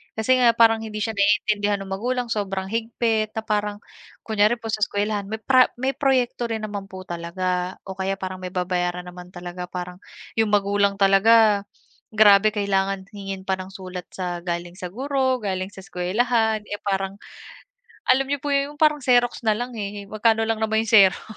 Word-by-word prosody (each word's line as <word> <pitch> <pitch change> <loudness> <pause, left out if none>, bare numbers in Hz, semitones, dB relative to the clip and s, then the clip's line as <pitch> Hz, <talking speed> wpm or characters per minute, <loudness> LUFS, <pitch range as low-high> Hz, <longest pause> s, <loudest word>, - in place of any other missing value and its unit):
Kasi 240 +4 +2
nga 240 -2 +5
parang 225 -1 +5
hindi 215 -1 -6
siya 225 - -1
naiintindihan 205 0 +2
nung 195 - -8
magulang 245 +5 -2
sobrang 195 -3 -2
higpit 225 -1 -1
na 220 - -1
parang 210 -1 -2 0.4
kunyari 215 +1 +2
po 225 - -6
sa 215 - -1
eskuwelahan 205 0 -2
may 220 +2 -5
pra 255 -1 +6
may 260 +2 -1
proyekto 255 -3 +1
rin 225 -1 -3
naman 205 -2 -5
po 190 -1 -9
talaga 180 +1 -3
o 190 -1 -8
kaya 190 +1 0
parang 185 -1 -6
may 185 - -5
babayaran 180 -1 -1
naman 180 0 -11
talaga 180 0 -7
parang 180 0 -7 0.4
yung 220 - +3
magulang 200 0 +1
talaga, 205 +1 +4 0.5
grabe 210 0 +6
kailangan 195 -1 0
hingin 195 -2 -7
pa 190 -1 -1
ng 185 - -6
sulat 185 -2 -7
sa 180 -2 -4
galing 175 +1 -5
sa 180 - -4
guro, 260 +5 0
galing 185 -2 -2
sa 195 -1 -12
eskwelahan, 220 +4 0
eh, 205 -1 -6
parang, 195 0 -2 0.9
alam 265 +1 +2
niyo 285 -1 -2
po 290 - -1
yung 280 +1 0
parang 300 0 +3
xerox 245 -2 +2
na 215 - +4
lang, 245 +3 -4
eh, 205 0 -5
magkano 220 +2 +1
lang 225 0 -1
naman 220 0 +1
yung 225 - -5
xerox. 195 -4 +6
205 Hz, 180 wpm, -23 LUFS, 190-225 Hz, 0.9 s, pra